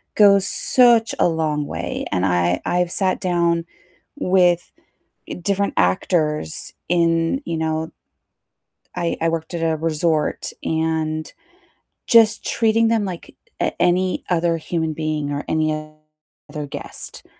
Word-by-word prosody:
goes 200 -2 +5
such 240 -3 +4
a - - +4
long 155 -3 -1
way, - - -4
and 90 +1 0
I 90 -1 +1
I've 175 0 0
sat 190 -2 +1
down 170 -2 0 0.5
with 180 - +2 0.7
different 200 +2 0
actors 150 - 0 0.2
in, 165 - +1
you 165 - -3
know 160 0 -2 1.0
I 170 -1 -2
I 165 - +1
worked 165 +1 -3
at 170 - -3
a 160 -1 +1
resort, 155 0 -1
and 160 -1 -2 0.7
just 225 -1 +5
treating 225 0 +2
them 225 -2 +1
like 180 -3 -7 0.3
a - - 0
any 180 +1 +1
other 170 -1 +1
human 160 0 -2
being 155 -2 -3
or 145 - -4
any 155 0 +1 0.8
other 150 -1 -5
guest - - -7
165 Hz, 125 wpm, -21 LUFS, 155-185 Hz, 1.0 s, goes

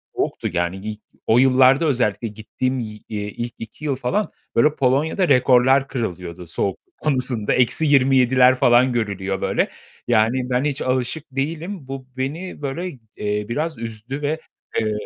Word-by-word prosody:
soğuktu, - - -2
yani. 85 +1 0
İlk 105 +2 -6 0.3
o 115 - +5
yıllarda 130 +3 +5
özellikle 120 -6 +1
gittiğim 125 +5 -3
yi 105 -2 -6
eee, 105 -1 -3
ilk 120 +3 -5
2 115 +7 -9
yıl 140 -3 +1
falan, 180 +12 -1 0.2
böyle, 150 +6 +4
Polonya'da 145 +8 +2
rekorlar 130 +2 +5
kırılıyordu 90 -8 -5
soğukluk 90 +3 -4
konusunda. 130 -7 0
-27'ler 130 -1 +4
falan 125 0 +4
görülüyor 100 -4 -2
böyle. - - +1 0.4
Yani, 115 -1 +3 0.2
ben 125 +1 +1
hiç 145 -1 -1
alışık 130 +4 -1
değilim. 155 +3 -4
Bu 135 -1 -7
beni 150 +7 -4
böyle, 150 +6 -3 0.3
eee, 105 0 -1
biraz 155 +4 -2
üzdü 115 +4 -6
ve, 150 +2 -1 0.4
eee, 110 -1 0
125 Hz, 145 wpm, -21 LUFS, 110-140 Hz, 0.4 s, o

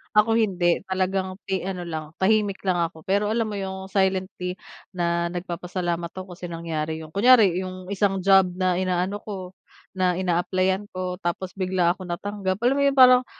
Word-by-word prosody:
ako 210 +1 +5
hindi. 180 -5 +2
Talagang 190 0 -1
pi 190 -1 -2
ano 180 -2 -4
lang 160 -2 -6
tahimik 205 0 +1
lang 185 -2 +1
ako, 165 -1 -3
pero 200 +2 +1
alam 220 0 0
mo 205 - -3
yung 190 0 -6
silently 190 -2 0 0.4
na 170 -1 0
nagpapasalamat 175 -1 -3
ako 185 -1 -7
kasi 175 0 -7
nangyari 160 -2 -4
yun. 155 - -12
Kunwari 200 -3 +5
yung 185 0 -6
isang 195 -2 0
job 195 -1 +6
na 185 -1 +1
inaano 185 +2 -1
ko, 190 -4 -7 0.5
na 180 -1 +2
in-applyan 185 +2 0
ko 185 0 -3
tapos 180 +1 -3
bigla 185 -2 +2
akong 185 0 -6
natanggap, 190 +2 -2
alam 255 +4 +3
mo - - +2
yun 280 - +3
parang 255 -1 +7
185 Hz, 170 wpm, -24 LUFS, 175-195 Hz, 0.5 s, parang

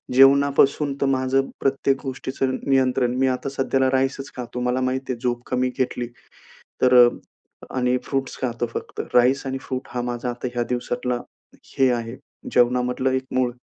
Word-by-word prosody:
जेवणापासून 140 +1 +5
तर - - +3
माझं 135 0 +1
प्रत्येक 135 0 +1
गोष्टीचं 130 0 -2
नियंत्रण, 130 -2 +2
मी 135 0 +3
आता 130 +1 -1
सध्याला 135 -1 +1
राईसच 135 +1 -1
खातो. 125 0 -5
मला 125 +1 0
माहिती 130 +1 -1
आहे 120 - -9
झोप 120 -1 -1
कमी 125 0 +1
घेतली, 125 -2 -1 0.8
तर 125 0 +5
अ, - - +3 0.7
आणि 125 0 +2
फ्रुट्स 135 -2 -2
खातो. 120 -1 -1
फक्त - - -5
राईस 130 +3 +4
आणि 135 0 -2
फ्रूट 130 0 -5
हा 125 - -2
माझा 120 +1 -3
आता 120 +1 -5
ह्या 120 - +1
दिवसातला, 125 0 -2 0.6
हे 135 -1 +5
आहे 120 0 -3 0.3
जेवणामधलं 125 +1 +2
एक 130 - -4
मूळ. 125 -1 +1
130 Hz, 160 wpm, -23 LUFS, 125-135 Hz, 0.8 s, जेवणापासून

